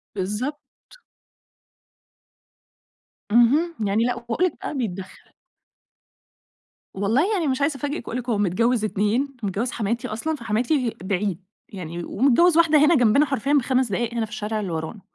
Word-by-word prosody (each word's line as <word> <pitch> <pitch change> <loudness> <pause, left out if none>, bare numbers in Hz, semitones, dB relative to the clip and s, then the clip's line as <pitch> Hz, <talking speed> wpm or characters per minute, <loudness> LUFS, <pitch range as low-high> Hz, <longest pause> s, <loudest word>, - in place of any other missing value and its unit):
بالضبط. 210 +10 -3 2.7
اهم, 285 +9 +4
يعني 210 +4 +1
لأ، 245 - 0
واقول 240 +9 -1
لِك 365 - -1
بقي - - -4
بيتدخل. 190 -5 -6 1.6
والله 235 - +1
يعني 350 -7 0
مش 265 +1 -1
عايزة 280 0 +1
أفاجئِك 290 -2 -4
وأقول 240 - -3
لِك، 250 0 -7
هو 225 - +1
متجوز 215 +4 +1
اتنين، 225 +7 0
متجوز 205 +5 -2
حماتي 230 +2 -2
أصلًا 270 +9 -3
فحماتي 235 +2 -1
بعيد، 190 -1 -2 0.3
يعني 175 -3 -6
ومتجوز 280 - +3
واحدة 330 -2 +5
هنا 335 +2 +5
جنبنا 245 +3 +4
حرفيًا 275 0 -1
ب5 260 -3 +2
دقايق 235 +4 -1
هنا 230 -2 -1
في 220 - -17
الشارع 215 0 -3
اللي 195 -4 -4
ورانا، 160 +6 -5
235 Hz, 145 wpm, -23 LUFS, 210-280 Hz, 2.7 s, واحدة